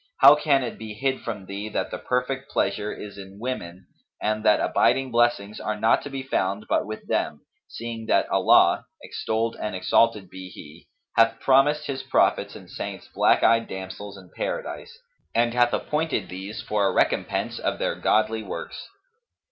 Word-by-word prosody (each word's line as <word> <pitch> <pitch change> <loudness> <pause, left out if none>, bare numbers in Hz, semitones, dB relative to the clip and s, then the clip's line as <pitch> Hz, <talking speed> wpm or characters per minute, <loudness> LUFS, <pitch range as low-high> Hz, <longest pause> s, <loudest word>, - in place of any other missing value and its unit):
how 140 +2 +11
can 145 -3 +2
it 120 - -5
be 110 -1 -7
hid 130 +4 -1
from 105 -5 -5
thee 100 +3 -5
that - - -2
the - - -4
perfect 130 +2 -2
pleasure 105 +2 -1
is 100 -1 -8
in 95 0 -11
women 95 -8 -5 0.3
and 110 0 -1
that 105 -1 +5
abiding 130 +1 +2
blessings 115 -3 +1
are 105 0 -3
not 110 +2 +3
to - - -7
be 135 -1 -5
found 100 -5 -1
but - - +1
with 110 0 -7
them, 75 - -1 0.3
seeing 115 -1 -7
that - - +3
Allah - - +4 0.2
(extolled 115 +1 -2
and 105 - -3
exalted 100 +2 +2
be 95 0 -9
He!) 80 -1 -13 0.3
hath 115 0 +4
promised 140 +3 +3
His 135 -1 -3
prophets 135 - +1
and - - -11
saints - - -7
black - - +3
eyed 115 0 +4
damsels 95 +1 -7
in 95 -2 -15
Paradise 465 -2 -4 0.4
and 115 0 +2
hath 120 0 +3
appointed 155 +3 -1
these 95 +4 -6
for 105 -2 +1
a - - +1
recompense - - 0
of - - -1
their - - -1
godly 110 +1 +1
works. - - -7
110 Hz, 170 wpm, -25 LUFS, 100-130 Hz, 0.4 s, how